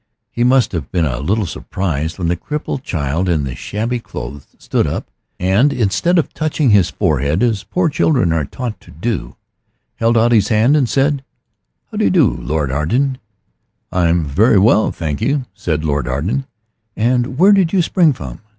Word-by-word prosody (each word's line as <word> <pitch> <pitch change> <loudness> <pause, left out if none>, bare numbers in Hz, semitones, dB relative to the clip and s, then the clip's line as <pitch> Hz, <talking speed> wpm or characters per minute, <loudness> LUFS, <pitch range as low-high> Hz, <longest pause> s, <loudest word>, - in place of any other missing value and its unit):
He 120 - -1
must 125 0 +3
have 80 -7 -5
been 85 -3 +1
a 65 -4 -2
little 100 +9 0
surprised 80 -2 -3
when 90 -3 -2
the 85 - +1
crippled 150 - -4
child 80 - -2
in 80 -4 +1
the 65 -2 -4
shabby 115 - -3
clothes 70 - -8
stood - - -1
up, - - -4 0.3
and 100 +10 +3
instead 125 - +1
of 165 - 0
touching 155 -4 0
his 100 -4 +4
forehead, 75 - 0
as 115 -5 0
poor 180 -1 0
children 140 - +2
are 80 -3 0
taught 120 - -6
to - - -19
do, 100 +7 -4 0.6
held 115 +1 +2
out 115 +1 +3
his 110 -3 +4
hand 115 +7 +3
and 135 -6 +2
said 140 0 +1 0.7
"How 215 - -6
do 215 - +2
you - - +4
do, 175 -6 +4
Lord 75 -3 -2
Arden?" 125 - 0 0.7
"I 90 -2 +2
am 85 -1 +1
very 100 - +3
well, 110 +2 +4
I - - 0
thank 75 -4 -4
you," 140 -2 0
said 80 -4 -2
Lord 70 -4 -1
Arden. 85 - -2 0.5
"And 125 +3 0
where 190 +6 +6
did 190 -5 +3
you 185 -3 +2
spring 165 -1 +3
from? 65 - -7
105 Hz, 185 wpm, -17 LUFS, 80-135 Hz, 0.7 s, where